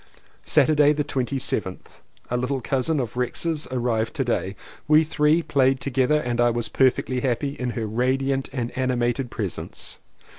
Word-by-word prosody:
Saturday 150 -1 +4
the 150 0 -1
27th. 130 -8 -3 0.3
A - - +1
little 125 +2 -1
cousin 135 +5 0
of 120 -4 -3
Rex's 150 +5 -2
arrived 120 -3 -1
to 135 - 0
day. 110 -5 -1 0.3
We 155 +1 +6
three 155 +1 +2
played 135 -3 +2
together 135 +3 +1
and 120 -4 -1
I 120 - +5
was 120 0 -2
per 130 -1 +5
fectly 125 0 -4
happy 130 +2 0
in 125 -3 -4
her 115 - -1
radiant 130 +4 0
and 120 -3 -4
animated 125 0 0
presence. 105 -6 -5
130 Hz, 155 wpm, -24 LUFS, 120-140 Hz, 0.3 s, We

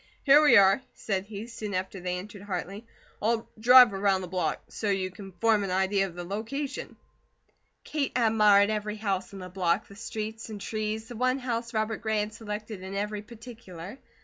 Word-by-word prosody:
"Here 285 +1 +7
we 300 - +7
are!" 195 +4 +6
said 195 -3 -2
he, 210 0 -6
soon 215 -4 -6
after 190 +1 -3
they 180 0 -2
entered 200 +2 -9
Hartley. 200 +2 -5 0.3
"I'll 225 +1 0
drive 245 0 +8
around 195 -1 +1
the 185 - -6
block, 180 0 -1
so 215 - -3
you 190 -1 0
can 195 +1 -10
form 215 +3 +2
an 195 - -3
idea 190 +1 +1
of 175 - -12
the 175 - -5
location." 230 +10 -4 0.9
Kate 295 -3 -2
admired 215 -3 +5
every 210 0 -2
house 195 -3 -2
in 200 - -9
the 185 -1 -7
block, 180 -2 0
the 200 - -14
streets 220 +2 -6
and 210 -2 -6
trees, 215 +1 -3
the 245 - -9
one 255 +3 +1
house 235 -3 -3
Robert 220 -1 -1
Gray 220 -2 0
had 210 +1 -4
selected 210 -2 -6
in 190 +1 -7
every 210 +1 -2
particular. 220 -3 -10
210 Hz, 190 wpm, -28 LUFS, 195-225 Hz, 0.9 s, drive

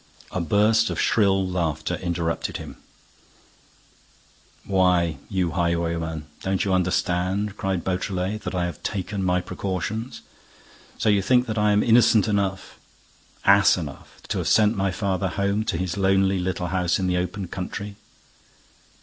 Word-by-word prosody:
A 90 - -2
burst 105 +6 +3
of - - -3
shrill 95 -3 +2
laughter 85 -4 -2
interrupted 85 -2 -2
him: - - -9 1.9
"Why, 90 -5 +2
you 90 -4 0
highwayman, 85 -2 -1 0.2
don't 95 0 -1
you 95 - +1
understand," 90 +2 0
cried 95 -4 -2
Beautrelet, 95 +2 -2
"that 95 - -5
I 90 -1 0
have 85 -3 -6
taken 100 0 -3
my 90 0 +1
precautions? 100 +7 -4 0.8
So - - -1
you 100 -1 +4
think 125 +5 +3
that 110 -3 -2
I 105 0 +3
am 105 0 +3
innocent 115 -2 +5
enough, 100 -3 -2 0.7
ass 100 0 +6
enough, 75 -6 -8
to - - -1
have - - -2
sent 110 +1 +4
my 95 -1 0
father 95 -1 -1
home 100 +3 0
to 85 - -1
his 90 +1 -3
lonely 95 0 +2
little 90 -1 -2
house 90 -1 +1
in 95 - -2
the 90 -1 +1
open 90 +2 -3
country!" 100 +3 -6
95 Hz, 145 wpm, -24 LUFS, 90-100 Hz, 1.9 s, ass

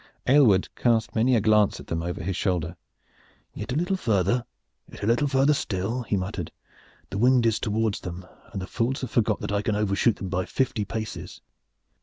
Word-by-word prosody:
Aylward 125 -9 +5
cast 115 -2 +1
many 120 +3 +3
a 110 - +3
glance 105 -1 +3
at - - -10
them 85 0 -2
over 85 0 -4
his 95 +1 -2
shoulder. 90 -3 -1 0.8
"Yet 105 +3 -6
a - - -1
little 175 +5 +1
farther! 110 - +1 0.5
Yet - - -10
a - - +1
little 120 +6 +2
farther 135 +2 +3
still!" 110 -1 -2
he 110 -4 -1
muttered. 90 -2 -4 0.6
"The 100 - -3
wind 125 0 +4
is 115 -2 +2
towards 110 -1 0
them 90 0 -7 0.3
and 100 - -4
the 95 - -4
fools 125 +6 -1
have 130 - -4
forgot 110 -3 +1
that - - -3
I 100 0 +1
can 105 0 -1
overshoot 105 +2 +2
them 95 - -6
by 90 0 -1
fifty 120 -5 -1
paces. 110 +2 -6
110 Hz, 195 wpm, -25 LUFS, 95-120 Hz, 0.8 s, Aylward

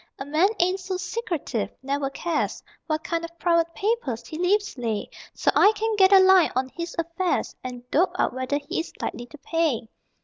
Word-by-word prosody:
A 270 - -6
man 310 +7 +3
ain't 365 +2 +2
so 370 0 -3
secretive, 340 - -3
never 275 0 -1
cares 325 +3 -2 0.2
What 310 -1 -1
kind 335 0 -2
of 335 0 -8
private 335 -1 +2
papers 385 - -1
he - - -8
leaves 405 +4 +1
lay, 230 -5 -2 0.3
So - - +2
I 410 - +6
can 440 +1 -1
get 385 -1 +5
a 395 - +9
line 375 -2 +6
on 260 +1 0
his 335 +4 -6
affairs 335 +2 -1
And 250 -1 -7
dope 355 +3 +2
out - - +1
whether 260 +2 -1
he 295 +5 -4
is 330 - -4
likely 240 - -4 0.2
pay. 315 -10 0
335 Hz, 190 wpm, -25 LUFS, 275-375 Hz, 0.3 s, a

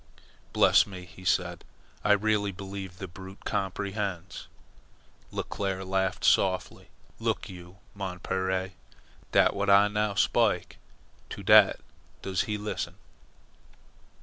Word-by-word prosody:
"Bless - - +5
me!" 90 -2 -9
he 85 +2 -15
said. 90 - 0 0.4
"I 105 - +5
really 105 -1 +1
believe 95 -1 -7
the 95 - -6
brute 95 +2 -12
comprehends." 100 -1 -3 0.8
Leclere 95 -1 -3
laughed 95 0 -1
softly. - - +2 0.3
"Look - - -2
you, 90 0 -11 0.2
mon 95 -3 -5
pere. 95 0 -2 0.6
Dat - - +5
w'at 100 0 -2
Ah 100 +1 +6
now 105 -1 -1
spik, 110 -3 +1 0.5
to - - -7
dat - - +6 0.4
does 95 -2 0
he 105 - 0
lissen." 105 +1 -4
95 Hz, 115 wpm, -28 LUFS, 95-100 Hz, 0.8 s, Ah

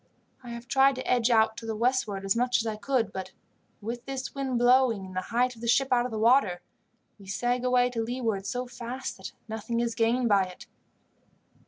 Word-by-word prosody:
I 245 - -9
have 235 0 -8
tried 270 +1 +4
to 255 - -6
edge 245 -1 +2
out 220 -1 +3
to 225 - -7
the 220 - -2
westward 220 -4 0
as 195 - +2
much 245 +1 +2
as 230 - -2
I 220 -1 -2
could, 225 -1 -1
but 190 0 -6 0.5
with 235 +3 -5
this 270 -1 -4
wind 270 -3 -2
blowing 245 -4 +4
and 185 0 -10
the 185 - 0
height 245 +2 +1
of 230 - -15
the 235 - -4
ship 270 +3 +3
out 245 0 +3
of 220 - -3
water, 220 -6 +3 0.6
we 195 - -14
sag 245 +5 -1
away 250 0 +3
to 230 -2 -2
leeward 225 -4 -2
so 250 +4 -2
fast 250 +1 -6
that 190 - -8 0.2
nothing 225 +1 -3
is 235 -1 0
gained 235 +1 +1
by 200 -3 +4
it. 180 -1 -11
235 Hz, 210 wpm, -28 LUFS, 220-250 Hz, 0.6 s, tried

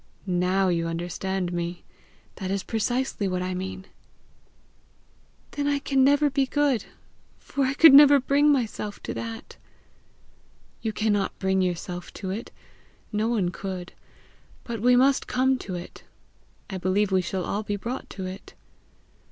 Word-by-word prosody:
"Now 185 +1 +1
you 165 -1 0
understand 175 +2 -3
me! 175 0 -4 0.5
That 190 -2 -4
is 195 0 -1
precisely 235 -1 -1
what 180 -1 -1
I 185 0 -2
mean." 190 +1 -5 1.7
"Then 285 0 -2
I 285 0 +2
can 275 -1 +1
never 285 +2 +4
be 275 -1 +1
good, 285 -4 +1 0.5
for 280 -1 -2
I 265 +1 -1
could 320 -1 +8
never 285 0 +9
bring 285 +3 +3
myself 220 -6 -2
to - - -4
that!" 230 0 -7 1.2
"You 220 - -1
cannot 210 -2 0
bring 190 0 +1
yourself 175 0 -3
to 190 -2 -5
it; 210 +4 -5 0.6
no 215 +1 0
one 215 -7 +1
could. 185 -1 -6 0.7
But 230 -3 -5
we 250 +2 +5
must 270 +2 +3
come 260 +1 +2
to 185 - -6
it. 175 - -9 0.6
I 190 -2 -5
believe 190 +3 +1
we 190 -1 +3
shall 180 +1 -3
all 205 - -2
be 205 -1 -3
brought 235 +6 -5
to 190 - -6
it." 185 +2 -9
205 Hz, 150 wpm, -25 LUFS, 185-260 Hz, 1.7 s, never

